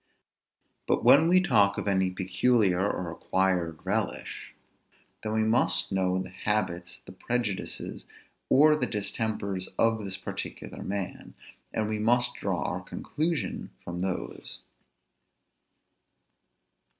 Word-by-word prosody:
But -, -, +1 dB
when 155 Hz, +4 st, +7 dB
we 180 Hz, +2 st, +6 dB
talk 105 Hz, -, +3 dB
of -, -, -3 dB
any 95 Hz, -2 st, +2 dB
peculiar 95 Hz, +1 st, +2 dB
or 90 Hz, -2 st, -4 dB
acquired 90 Hz, -3 st, 0 dB
relish, 105 Hz, +1 st, -3 dB, 0.7 s
then 110 Hz, -, -3 dB
we 110 Hz, 0 st, +2 dB
must 110 Hz, 0 st, +2 dB
know 95 Hz, -1 st, +1 dB
the 95 Hz, -, -4 dB
habits, 90 Hz, -3 st, -2 dB
the -, -, -10 dB
prejudices, 120 Hz, -5 st, -3 dB, 0.4 s
or 150 Hz, +3 st, +6 dB
the 150 Hz, -, 0 dB
distempers 100 Hz, -2 st, -2 dB
of 115 Hz, -1 st, +3 dB
this 95 Hz, -1 st, -3 dB
particular -, -, -6 dB
man, 100 Hz, -2 st, -4 dB, 0.4 s
and 110 Hz, -1 st, -1 dB
we 110 Hz, 0 st, -1 dB
must 120 Hz, +3 st, +3 dB
draw -, -, -2 dB
our -, -, -2 dB
conclusion 160 Hz, +1 st, -3 dB
from 85 Hz, 0 st, -5 dB
those. 95 Hz, 0 st, -4 dB
100 Hz, 115 wpm, -28 LUFS, 95-115 Hz, 0.7 s, when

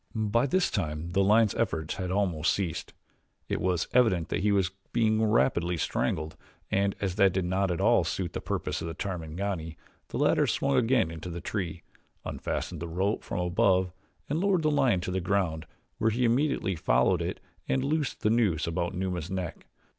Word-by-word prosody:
By 110 Hz, +4 st, +1 dB
this 185 Hz, +6 st, +1 dB
time 80 Hz, -3 st, -2 dB
the 100 Hz, +2 st, +3 dB
lion's 105 Hz, +1 st, +4 dB
efforts 80 Hz, -1 st, -1 dB
had 90 Hz, -2 st, -3 dB
almost 90 Hz, -5 st, +1 dB
ceased 90 Hz, -5 st, -3 dB, 0.6 s
it -, -, -2 dB
was 90 Hz, -2 st, 0 dB
evident 95 Hz, -9 st, +3 dB
that -, -, -1 dB
he 105 Hz, +1 st, +2 dB
was 95 Hz, -2 st, +2 dB, 0.2 s
being 110 Hz, -2 st, +2 dB
rapidly 90 Hz, -6 st, +2 dB
strangled 80 Hz, 0 st, -1 dB, 0.4 s
and 100 Hz, 0 st, +1 dB
as 95 Hz, -1 st, -2 dB
that 100 Hz, -3 st, +5 dB
did 95 Hz, -1 st, 0 dB
not 95 Hz, +2 st, +1 dB
at 85 Hz, -, -1 dB
all -, -, +4 dB
suit 90 Hz, -3 st, -3 dB
the -, -, -4 dB
purpose -, -, -3 dB
of -, -, -4 dB
the 80 Hz, -, -5 dB
Tarmangani 85 Hz, -2 st, -4 dB, 0.3 s
the -, -, -5 dB
latter -, -, +3 dB
swung 70 Hz, -, +1 dB
again 115 Hz, -, +3 dB
into 80 Hz, +2 st, -7 dB
the 85 Hz, 0 st, -5 dB
tree, 85 Hz, -2 st, -4 dB, 0.4 s
unfastened 85 Hz, -3 st, -4 dB
the 85 Hz, -, -3 dB
rope 95 Hz, +5 st, -1 dB
from 90 Hz, -, -3 dB
above 95 Hz, 0 st, +2 dB, 0.4 s
and 150 Hz, +3 st, -1 dB
lowered 190 Hz, -3 st, +2 dB
the 155 Hz, -, +3 dB
lion 125 Hz, -10 st, +3 dB
to 90 Hz, -, -3 dB
the 95 Hz, 0 st, -1 dB
ground 85 Hz, -4 st, -1 dB, 0.3 s
where 110 Hz, -, +3 dB
he 120 Hz, +3 st, +1 dB
immediately 120 Hz, -5 st, +1 dB
followed -, -, +2 dB
it -, -, -3 dB, 0.3 s
and 130 Hz, -, +1 dB
loosed 150 Hz, 0 st, -1 dB
the 105 Hz, -, +2 dB
noose 105 Hz, -9 st, +2 dB
about 85 Hz, +2 st, -2 dB
Numa's 90 Hz, -3 st, -3 dB
neck. 95 Hz, -3 st, -5 dB
95 Hz, 185 wpm, -28 LUFS, 85-110 Hz, 0.6 s, that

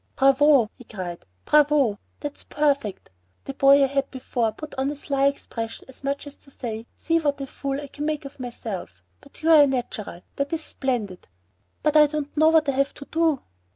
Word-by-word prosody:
"Bravo!" 275 Hz, -3 st, +5 dB
he -, -, -11 dB
cried, 180 Hz, -6 st, -7 dB, 0.2 s
"bravo! 290 Hz, -8 st, +4 dB, 0.2 s
that's 290 Hz, -1 st, -6 dB
perfect. 280 Hz, -, -1 dB, 0.3 s
The 275 Hz, -, -5 dB
boy 275 Hz, +1 st, +6 dB
I -, -, +6 dB
had 275 Hz, 0 st, -1 dB
before 245 Hz, -3 st, -1 dB
put 310 Hz, +6 st, -9 dB
on 265 Hz, +1 st, -1 dB
a 295 Hz, -, -4 dB
sly 275 Hz, -1 st, +1 dB
expression 230 Hz, -5 st, -4 dB
as 265 Hz, +1 st, -15 dB
much 280 Hz, +1 st, -2 dB
as 285 Hz, -1 st, -9 dB
to -, -, -18 dB
say, 230 Hz, -4 st, -6 dB
'See 330 Hz, 0 st, +1 dB
what 290 Hz, -3 st, 0 dB
a 275 Hz, -, -3 dB
fool 275 Hz, +1 st, -4 dB
I 290 Hz, -, -6 dB
can 290 Hz, +1 st, -6 dB
make 305 Hz, -1 st, -2 dB
of 275 Hz, 0 st, -10 dB
myself'; 210 Hz, -, -6 dB, 0.4 s
you 325 Hz, +1 st, +3 dB
are 295 Hz, -3 st, +8 dB
natural; 235 Hz, -8 st, -4 dB, 0.2 s
that 280 Hz, +2 st, -2 dB
is 325 Hz, -1 st, -2 dB
splendid." 230 Hz, -12 st, -3 dB, 0.6 s
"But 300 Hz, 0 st, +2 dB
I 300 Hz, -1 st, +8 dB
don't 295 Hz, -1 st, -4 dB
know 315 Hz, +1 st, +5 dB
what 320 Hz, -2 st, +4 dB
I -, -, +3 dB
have 275 Hz, +1 st, 0 dB
to 280 Hz, -, -9 dB
do." 320 Hz, -3 st, +1 dB
275 Hz, 195 wpm, -24 LUFS, 245-295 Hz, 0.6 s, are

